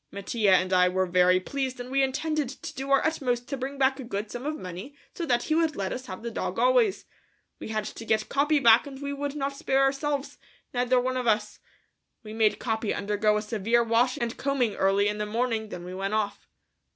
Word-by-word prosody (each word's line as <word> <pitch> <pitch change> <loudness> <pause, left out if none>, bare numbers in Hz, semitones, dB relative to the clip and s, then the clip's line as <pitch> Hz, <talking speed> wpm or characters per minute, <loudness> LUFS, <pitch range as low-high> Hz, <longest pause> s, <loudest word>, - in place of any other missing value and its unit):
Mattia 200 0 +2
and 185 +1 +1
I 180 0 +5
were 185 +1 +1
very 180 0 +4
pleased 260 +5 -3
and 245 +1 -7
we 275 0 +2
intended 295 +1 -1
to 265 - -8
do 270 +1 -6
our 275 0 +4
utmost 250 -6 -1
to 275 - -2
bring 270 +2 -5
back 265 0 +2
a - - -5
good 210 -2 -4
sum 245 +4 -5
of 305 0 -2
money 185 - -8 0.2
so 335 - -4
that 240 -2 +2
he 310 - -1
would 320 -1 +2
let 195 -1 -2
us 255 +1 -7
have 185 +3 -8
the 235 - -4
dog - - -3
always. - - +3 0.5
We - - -7
had 215 -1 -2
to 230 - -7
get 220 -1 0
Capi 295 +2 +2
back 235 -1 +6
and 270 -1 -9
we 280 0 -4
would 285 0 -4
not 280 -1 -2
spare 275 -2 +1
ourselves, 275 +1 -1 0.3
neither 250 0 +2
one 255 +1 -1
of 250 -1 -2
us. 210 -1 0 0.6
We 215 -1 -8
made 220 -1 +2
Capi 220 -2 -2
undergo 210 +1 +1
a 210 - -2
severe 225 +2 +1
washing 235 +2 +1
and 235 0 -3
combing 265 -6 0
early 195 +1 +2
in 210 0 -2
the 210 - -2
morning, 225 -1 -1
then 180 -3 -7
we 180 +1 -7
went 195 +3 -2
off. 205 -2 -2
240 Hz, 225 wpm, -27 LUFS, 210-275 Hz, 0.6 s, back